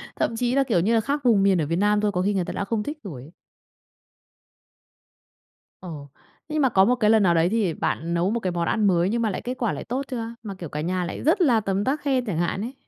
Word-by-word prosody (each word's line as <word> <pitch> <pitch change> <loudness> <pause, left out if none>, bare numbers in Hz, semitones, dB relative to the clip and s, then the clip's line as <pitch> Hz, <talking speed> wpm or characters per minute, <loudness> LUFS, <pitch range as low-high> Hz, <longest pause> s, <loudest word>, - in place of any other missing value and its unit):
thậm 230 - -1
chí 245 +2 0
là, 275 - +4
kiểu 225 -9 +1
như 210 +7 +1
là, 225 - +3
khác 285 +6 -1
vùng 215 -5 +4
miền 190 -4 +3
ở - - 0
Việt 165 - -1
Nam 205 +3 +2
thôi 210 -1 +1
có 180 - -1
khi 205 +2 +1
người 185 -3 0
ta - - -5
đã 200 - -3
không 210 +1 -2
thích 300 +5 -5
rồi 150 - -8
ấy. 150 +5 -13 2.5
Ồ. 150 -6 -8 0.4
Thế - - -6
nhưng 310 - +1
mà 265 - +4
có 190 -2 +4
một 250 +3 +3
cái 215 -3 +2
lần 220 -2 +5
nào 175 -2 +4
đấy 165 +2 +2
thì 205 -7 0
bạn 170 +1 -2
nấu 170 +2 +1
một 235 - -1
cái 185 -5 -2
món 170 -1 -2
ăn 215 -2 +2
mới 175 0 +2
nhưng 235 +1 -1
mà 220 - +1
lại 190 - -4
kết 250 +1 -4
quả 235 -4 -1
lại - - -6
tốt 260 +4 -3
chưa? 230 -2 -5
Mà 205 - -6
kiểu 170 -5 -8
cả 150 - -4
nhà 180 +2 -1
lại - - -6
rất 330 +6 +2
là 245 -9 +4
tấm 195 -1 -1
tắc 285 +5 -1
khen 265 -3 0
chẳng 195 -8 -3
hạn 175 +3 -1
ấy? 245 +4 -5
205 Hz, 285 wpm, -24 LUFS, 180-240 Hz, 2.5 s, lần